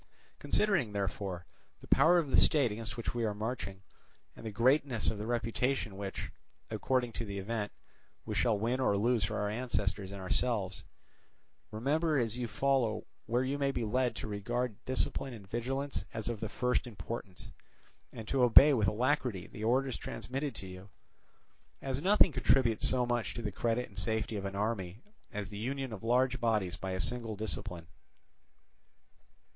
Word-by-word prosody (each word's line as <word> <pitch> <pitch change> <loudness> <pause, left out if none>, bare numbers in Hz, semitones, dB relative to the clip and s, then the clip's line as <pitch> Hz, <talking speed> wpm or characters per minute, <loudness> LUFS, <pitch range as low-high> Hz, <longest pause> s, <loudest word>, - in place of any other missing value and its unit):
Considering, 180 - +1
therefore, 95 -3 -3 0.3
the - - -14
power 160 +6 +6
of 155 -6 0
the - - +4
state 140 -7 +5
against 110 +1 -5
which 115 - -3
we 120 -1 -1
are 105 -2 0
marching, 105 -3 -4 0.5
and - - -12
the 110 - -4
greatness 125 +2 +3
of 105 - -6
the 105 - -4
reputation 120 -1 0
which, 100 0 -5 0.4
according 125 -2 0
to 115 - -4
the 100 -2 -5
event, 105 +1 -3 0.5
we 110 - -3
shall 110 +1 +2
win 120 +5 0
or 115 -6 +2
lose 115 +2 +2
for - - -1
our 105 - 0
ancestors 105 -4 -1
and 100 - -7
ourselves, 95 0 -1 0.9
remember 150 +8 +1
as 115 -3 0
you 125 -1 -2
follow 125 -2 +1 0.2
where 120 +3 +2
you 140 +2 -1
may 140 -1 +2
be 120 -4 -2
led 125 +3 +1
to - - -5
regard 110 +2 -2
discipline 130 0 0
and 100 -4 -12
vigilance 135 +6 -2
as 110 0 -2
of 115 -3 -3
the 110 - -3
first 125 +2 0
importance, 100 -2 -7 0.6
and 110 -1 -8
to 135 +1 +1
obey 130 +4 +8
with 110 -6 +2
alacrity 120 -2 0
the 105 - -8
orders 130 +3 +2
transmitted 135 +2 -4
to - - -6
you; 95 +1 -10 0.9
as 135 0 -3
nothing 195 0 +5
contributes 120 -5 +3
so 125 -1 +2
much 120 -1 -1
to 120 - -4
the 105 - -2
credit 115 +4 0
and 100 -3 -7
safety 110 +2 -1
of 100 -1 -3
an 100 0 -4
army 100 -3 -2 0.3
as 105 -3 -4
the 100 - -6
union 135 +1 -3
of 100 - -7
large 125 +2 +2
bodies 105 -6 +1
by 95 - -5
a 95 0 -2
single 115 0 -2
discipline." 90 -5 -4
115 Hz, 175 wpm, -32 LUFS, 105-130 Hz, 0.9 s, obey